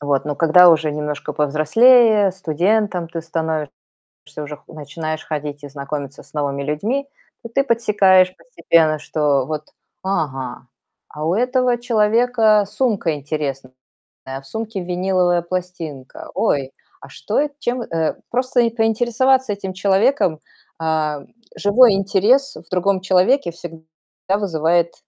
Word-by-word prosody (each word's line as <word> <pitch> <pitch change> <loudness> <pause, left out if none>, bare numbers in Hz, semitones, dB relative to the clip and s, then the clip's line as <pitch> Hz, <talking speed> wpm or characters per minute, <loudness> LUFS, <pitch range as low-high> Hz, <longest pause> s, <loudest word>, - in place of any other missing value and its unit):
Вот. 145 -2 0
Но 145 -1 -3
когда 170 +4 +6
уже 155 -1 +2
немножко 150 0 -4
повзрослее, 205 - +4
студентом 185 +1 0
ты 165 0 -5
становишься, 160 -3 -3 0.7
уже 150 0 -6
начинаешь 155 +1 -6
ходить 145 -1 -5
и 145 - -8
знакомиться 140 0 -6
с - - -22
новыми 140 -2 -2
людьми, 215 - -2 0.4
то 230 - -8
ты 275 +4 +1
подсекаешь 195 -7 +3
постепенно, 160 - +1
что 145 -3 0
вот: 155 -1 -6 0.3
"Ага, 135 -9 -3 0.4
а 150 +1 -6
у 165 - +1
этого 250 +1 +1
человека 225 -2 +2
сумка 205 -10 -1
интересная, 140 -3 -5 0.5
а 135 +1 -6
в 135 - -18
сумке 220 0 -5
виниловая 180 0 0
пластинка. 170 -6 -6
Ой, 135 -2 0 0.3
а - - -13
что, - - -3
э, 295 +1 +1
чем" 245 -2 -2
Э, 165 -6 -2
просто 255 0 +1 0.2
поинтересоваться 240 +2 +2
этим 195 -2 -6
человеком. 195 - +1 0.4
А, 155 -2 -1 0.3
живой 220 +3 +5
интерес 205 +8 +2
в - - -14
другом 185 +1 +1
человеке 190 +4 +2
всегда 165 -1 -11 0.5
вызывает 170 -3 0
175 Hz, 125 wpm, -19 LUFS, 150-220 Hz, 0.7 s, когда